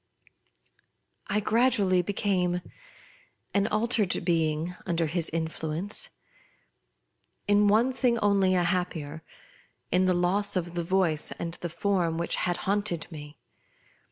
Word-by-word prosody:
I 210 - +1
gradually 210 -5 +3
became 180 -2 0 0.9
an 200 +1 +2
altered 215 -3 +1
being 165 0 0
under 170 -2 +1
his 165 +1 -1
influence. 165 - -3 1.4
In 205 0 +4
one 230 +6 +3
thing 250 -2 +1
only 200 -3 +3
a 180 - +2
happier 170 -4 -2 0.4
— - - -35
in 185 +1 +3
the 185 - +3
loss 195 +4 +1
of 175 -2 -1
tfie 170 -1 -2
Voice 170 -4 +1
and 170 -1 -5
the 175 - -3
Form 170 -1 0
which 170 - 0
had 175 -1 0
haunted 200 -4 0
me. 150 -1 -10
180 Hz, 125 wpm, -27 LUFS, 165-205 Hz, 1.4 s, In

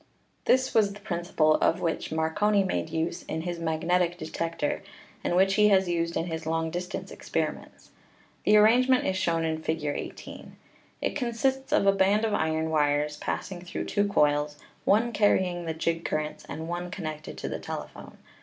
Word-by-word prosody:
This 260 +1 +3
was 205 -3 +3
the 205 - -11
principle 170 -6 +1
of 165 - +2
which 165 - -2
Marconi 195 +6 +2
made 185 -4 -2
use 165 +2 -2
in 160 - -4
his 175 0 -4
magnetic 170 +2 +1
detector, 165 -2 -3 0.4
and - - 0
which 190 +1 +4
he 210 +1 +5
has 190 -2 +4
used 170 -1 -1
in 165 - -1
his 160 -2 -5
long 165 0 0
distance 180 +3 -5
experiments. - - -4 0.5
The 210 - +5
arrangement 250 +4 +5
is 190 - 0
shown 170 -3 +1
in 160 0 -2
Fig. 160 -1 -2
18. 145 - -6 0.5
It - - -1
consists 265 +2 -1
of 300 - +3
a 195 - +7
band 195 +3 +3
of 220 - -1
iron 160 -3 0
wires 150 -1 +1
passing 175 +3 -4
through 180 - -5
two 205 0 +1
coils, 145 -5 +2 0.3
one 225 +4 +3
carrying 185 -5 +2
the 160 - -2
jig 165 +1 -1
currents 155 0 -3
and 160 +1 -5
one 175 +1 -4
con 185 -1 -6
nected 155 0 -6
to - - -4
the - - -4
telephone. - - -8
175 Hz, 175 wpm, -27 LUFS, 160-205 Hz, 0.5 s, a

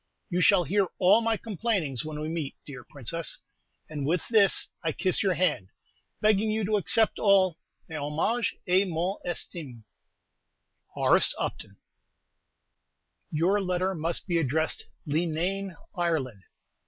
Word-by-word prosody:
You 180 +1 +1
shall 190 -1 +5
hear 195 +5 +1
all 200 +5 +5
my 225 -1 +1
complainings 200 - -1
when 155 -1 -6
we 155 - -3
meet, 160 -3 -4
dear 135 -4 -9
Princess; 155 +5 -2 0.5
and 150 -2 -5
with 165 +5 0
this 210 -4 +4
I 160 -1 0
kiss 185 -2 0
your 190 -3 +1
hand, 155 - 0 0.5
begging 215 0 +3
you 215 -1 0
to 210 +1 +2
accept 210 +4 +2
all 190 -5 +4 0.3
"mes 160 -2 -5
hommages" 160 +12 0
et 190 +1 +3
mon 180 +3 -2
estime, 150 -9 -4 1.1
H. - - +4
U. - - -1 1.8
Your 180 +7 +2
letter 185 0 0
must 165 0 -2
be 175 -3 +1
addressed 160 +2 -1 0.2
"Leenane, 170 +5 -1 0.2
Ireland." 150 - -2
175 Hz, 130 wpm, -27 LUFS, 155-195 Hz, 1.8 s, shall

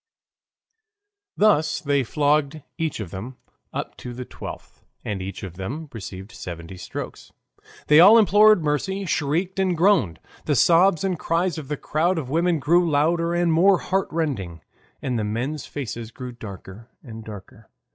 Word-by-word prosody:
Thus 160 -8 +3
they 140 -1 +1
flogged 150 +2 0 0.2
each 160 -6 -2
of 100 -6 -6
them 120 +7 -7 0.3
up - - -5
to 120 -1 -8
the 125 +1 -6
twelfth, - - -10 0.2
and 100 -3 -3
each 95 +1 -6
of 90 -2 -8
them 140 +11 -5
received 95 -1 -8
seventy 85 -6 -8
strokes. 90 - -8 0.5
They 150 +1 +6
all 200 +7 +9
implored 210 -3 +6
mercy, 190 +7 -1
shrieked 170 +4 -1
and 185 -3 +1
groaned. 160 - +3 0.3
The 145 - +1
sobs 170 +3 +4
and 185 -4 -1
cries 170 0 0
of 145 - -9
the 150 0 -3
crowd 170 +6 0
of 135 -5 -4
women 170 +2 +2
grew 170 +4 +3
louder 165 +3 +1
and 175 -1 +2
more 185 +4 +5
heart 190 +2 -1
rending, 100 - -3 0.4
and 125 -3 -1
the - - -1
men's 125 +8 -3
faces 120 -5 -6
grew 125 +1 -8
darker 110 0 -10
and 115 -4 -9
darker. 110 +1 -12
150 Hz, 155 wpm, -23 LUFS, 115-170 Hz, 0.5 s, all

